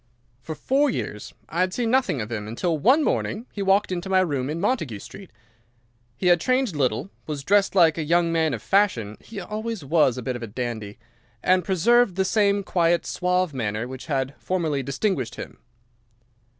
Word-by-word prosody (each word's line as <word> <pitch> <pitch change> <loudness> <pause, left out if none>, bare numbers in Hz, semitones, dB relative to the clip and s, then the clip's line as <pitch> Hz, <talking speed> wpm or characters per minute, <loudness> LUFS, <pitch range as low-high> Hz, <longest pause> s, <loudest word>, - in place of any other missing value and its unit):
"For 155 +4 -6
four 280 - +2
years 105 - -4 0.2
I 170 - -4
had 185 0 +1
seen 235 -2 0
nothing 255 - +2
of 105 +2 -6
him 105 -2 -4
until 160 +10 -1
one 260 - +4
morning 225 -4 -1
he 205 - -5
walked 195 +1 +2
into 180 +1 -3
my 190 -1 +4
room 140 -7 -1
in 160 +2 -3
Montague 170 - -1
Street. 190 - -11 0.9
He - - -4
had 175 -2 +5
changed 255 -6 +1
little, 135 - -1 0.2
was 145 -3 -4
dressed 200 +2 +3
like 165 -3 +5
a - - 0
young 170 +2 +2
man 160 -4 +1
of 110 - -10
fashion—he 195 - 0
was 215 0 -5
always 150 -7 +4
a 125 - -5
bit 125 +1 -2
of 120 - -6
a 115 - -5
dandy—and 120 - -3
preserved 205 +3 +3
the 190 0 +1
same 200 0 +2
quiet, 170 -2 +1
suave 180 -2 0
manner 110 -2 -2
which 130 0 -9
had 135 -2 -1
formerly 160 -6 -1
distinguished 135 - -2
him. - - -9
170 Hz, 180 wpm, -24 LUFS, 130-200 Hz, 0.9 s, had